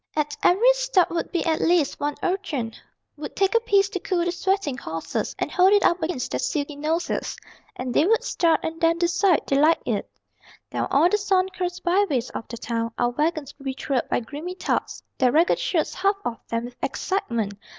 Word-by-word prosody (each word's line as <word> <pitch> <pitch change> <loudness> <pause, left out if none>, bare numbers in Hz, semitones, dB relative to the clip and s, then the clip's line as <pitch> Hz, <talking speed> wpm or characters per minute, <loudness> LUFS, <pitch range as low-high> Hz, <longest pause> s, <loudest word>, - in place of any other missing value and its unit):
At 295 -1 -1
every 455 +8 +5
stop - - +2
would 335 - -2
be 345 - -1
at 320 -2 +1
least 335 -4 +2
one 290 0 -1
urchin 310 - -2 0.4
Would 295 0 -7
take 390 +2 +2
a 465 - +5
piece 400 -4 +3
to 375 - -3
cool 345 -1 -1
the 350 - 0
sweating 380 -4 0
horses 165 -8 -4
And - - -2
hold 370 +2 +5
it 410 - +4
up 350 +1 +3
against 320 -6 -2
their 125 - -1
silky 290 - -2
noses 320 +4 -2 0.4
And 250 -1 -4
they 310 - +4
would 450 +2 +3
start, 330 -2 +2
and 320 0 -4
then 330 0 +3
decide 355 0 +2
they 275 - +1
liked 315 +3 +3
it. - - -1 0.6
Down - - -1
all 295 +5 +4
the 420 +3 +1
sun 380 -2 +2
cursed 360 -1 -4
byways 345 - +1
of - - -6
the 235 - -7
town 230 0 -2
Our 240 - +1
wagons 300 +1 -1
would 275 - -14
be 265 -1 -2
trailed 265 -2 -2
by - - +1
grimy 305 +9 -7
tots, - - -2 0.2
Their 255 -2 +4
ragged 325 +5 +3
shirts 325 -4 0
half 395 +2 +1
off 230 - -5
them 230 0 -2
with 245 0 -10
excitement! 235 - -1
330 Hz, 205 wpm, -24 LUFS, 275-370 Hz, 0.6 s, every